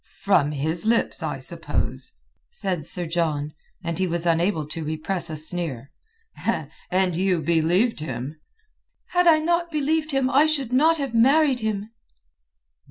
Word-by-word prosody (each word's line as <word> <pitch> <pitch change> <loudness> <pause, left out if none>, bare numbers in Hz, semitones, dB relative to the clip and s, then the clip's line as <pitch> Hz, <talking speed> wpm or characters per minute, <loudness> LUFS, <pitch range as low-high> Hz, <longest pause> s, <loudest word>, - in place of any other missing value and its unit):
"From 150 -8 +3
his 160 +7 -2
lips, 230 +1 +1
I - - -3
suppose?" - - -2 0.4
said 185 - -3
Sir 180 - +2
John, 155 -3 -1 0.3
and 170 +1 -3
he 190 - +1
was 170 0 -3
unable 165 -1 +1
to 165 +1 -5
repress 165 +3 -3
a 155 - -4
sneer. 155 -5 +1 1.0
"And 185 -1 +1
you 180 -2 +1
believed 170 +7 +2
him?" 150 0 -6 0.7
"Had 355 0 +2
I 325 -2 +7
not 340 +2 0
believed 310 0 0
him 270 -3 +1
I 275 +4 +4
should 275 -6 -1
not 320 +5 +4
have 275 -5 -4
married 270 +3 +4
him." 215 -1 -3
185 Hz, 145 wpm, -24 LUFS, 160-270 Hz, 1.0 s, I